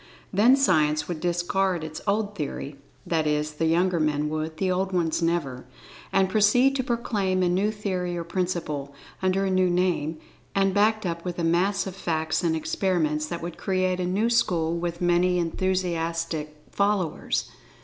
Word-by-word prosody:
Then 225 +7 +6
Science 155 - +2
would 175 -3 -4
discard 175 +1 0
its 155 0 -6
old 205 +1 0
theory 140 -4 -5 0.3
(that 160 -2 0
is, 150 0 0
the 160 +2 -1
younger 175 +2 +2
men 150 -1 0
would—the 155 +4 -2
old 190 +1 0
ones, 170 -2 0
never) 150 -7 -1 0.4
and 195 -1 +3
proceed 220 +7 +4
to 260 - 0
proclaim 210 -7 0
a - - +3
new 190 +4 +2
theory 185 -5 -3
or 170 - -3
principle, 165 -5 -3 0.3
under 190 +1 +1
a 190 - 0
new 185 -1 +3
name, 175 -3 0 0.4
and 195 -1 +2
backed 215 +1 +2
up 170 -1 -3
with 180 -1 -4
a 170 - -2
mass 180 +4 +2
of 190 -2 -6
facts 160 -4 -1
and 165 -2 +2
experiments 155 -3 0
that 170 +1 -5
would 170 -1 -6
create 185 -1 0
a 180 - -1
new 210 +6 +1
school 170 -8 +1
with 170 0 -3
many 175 +1 +3
enthusiastic 165 -3 -1
followers. 200 -5 0
175 Hz, 165 wpm, -25 LUFS, 160-190 Hz, 0.4 s, Then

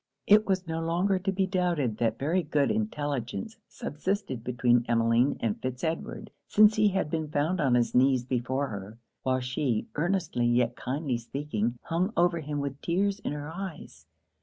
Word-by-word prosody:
It 215 +1 +5
was 190 -1 0
no 165 0 -3
longer 180 +4 +1
to 195 +1 -1
be 190 0 +1
doubted 175 - 0
that 115 -1 0
very 165 +7 +1
good 145 -3 +1
intelligence 150 - -3
subsisted 150 - -3
between 120 -1 +2
Emmeline 115 +3 +3
and 110 -3 -1
Fitz 130 -1 -4
Edward, 165 0 -3 0.2
since 215 0 +6
he 215 0 +4
had 190 -6 0
been 160 -2 -1
found 155 +6 0
on 130 -4 +3
his 120 -1 +1
knees 130 -1 +4
before 130 +2 -1
her; 100 +1 -7 0.2
while 130 0 0
she, 125 -2 -1
earnestly 165 -7 0
yet 120 0 +2
kindly 130 -2 -2
speaking, 120 -2 -3
hung 180 +6 -1
over 175 -1 +3
him 150 -1 -4
with 140 0 -4
tears 195 +4 0
in 200 - -3
her 150 +1 -5
eyes. 160 - -8
145 Hz, 170 wpm, -28 LUFS, 125-180 Hz, 0.2 s, since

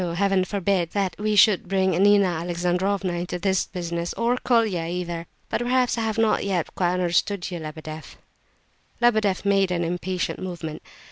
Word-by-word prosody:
Heaven 195 0 +2
forbid 190 -3 -1
that 195 -3 -1
we 215 0 0
should 200 -2 +5
bring 190 0 +1
Nina 200 +3 +5
Alexandrovna 180 +2 -1
into 175 +1 -3
this 190 +1 0
business! 170 -2 -4
Or 235 +2 +1
Colia, 220 -10 +1
either. 170 -1 -4 0.2
But - - -2
perhaps 250 0 +2
I 230 - -2
have 225 -1 -1
not 225 -1 +2
yet 185 -4 -2
quite 175 -1 +1
understood 180 +2 0
you, 175 - -4
Lebedeff?" 155 0 -8 0.8
Lebedeff 215 -6 +2
made 195 -1 +3
an 175 -1 -1
impatient 180 +2 -2
movement. 170 -4 -6
185 Hz, 155 wpm, -24 LUFS, 175-200 Hz, 0.8 s, should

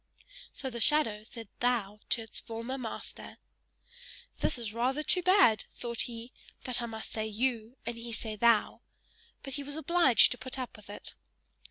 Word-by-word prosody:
So 265 - -4
the 235 - -5
shadow 225 -6 +3
said 225 0 -9
THOU 225 -4 +1
to 235 - +2
its 225 - -3
former 230 +3 -5
master. 235 -3 -7 1.0
"This - - +1
is 225 -3 -4
rather 260 +6 0
too 360 - +3
bad," 360 - +5
thought 235 -1 -1
he, 235 +1 -8 0.3
"that 250 -1 0
I 235 - -2
must 220 -1 -6
say 220 -1 -2
YOU 230 +2 -1
and 235 0 -3
he 230 0 -6
say 220 -1 -2
THOU," 230 0 +3 0.6
but 270 - -6
he 285 - -2
was 285 +1 -5
now 315 - -4
obliged 340 -8 +6
to 250 - -3
put 260 +3 -5
up 255 -1 -5
with 210 -2 -15
it. 205 - -9
235 Hz, 180 wpm, -31 LUFS, 220-260 Hz, 1.0 s, obliged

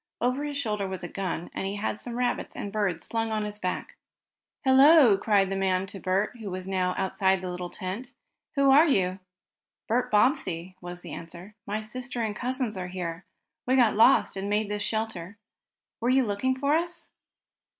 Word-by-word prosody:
Over 255 +4 0
his 290 -1 -3
shoulder 210 -7 -1
was 190 -1 -5
a - - -3
gun, 180 -2 -4
and 195 - -3
he 200 - -3
had 210 +1 -2
some 240 -1 -6
rabbits 250 0 -1
and 200 - -5
birds 195 -6 -1
slung 225 -1 -2
at 215 -1 0
his 210 0 -6
back. 180 -2 -4 0.7
"Hello!" 265 -3 +7
called 195 -1 +2
the - - 0
man 190 -1 +1
to 195 0 -7
Bert, 195 +6 0
who 220 -3 -6
was 185 0 -5
now 185 -1 0
outside 190 0 +1
the 180 0 -5
little 180 0 -5
tent. 210 +9 -6 0.4
"Who 275 -1 +4
are 300 +5 +7
you?" 190 - +1 0.7
"Bert 245 +3 +1
Bobbsey," 190 - +1
was 175 0 -8
the - - -8
answer. 170 +5 -9
"My 210 +2 -2
sister 250 +3 -5
and 215 -2 -2
cousins 250 -4 -2
are 180 -1 -4
here. 180 -1 -5 0.4
We 260 - +3
got 240 -4 +5
lost 230 +1 +5
and 195 +1 -3
made 210 0 0
this 210 0 -2
shelter. 220 -3 -3 0.6
Were 235 - 0
you 260 0 +4
looking 245 +6 0
for 280 +2 +1
us?" 345 +2 -2
210 Hz, 190 wpm, -27 LUFS, 185-245 Hz, 0.7 s, Hello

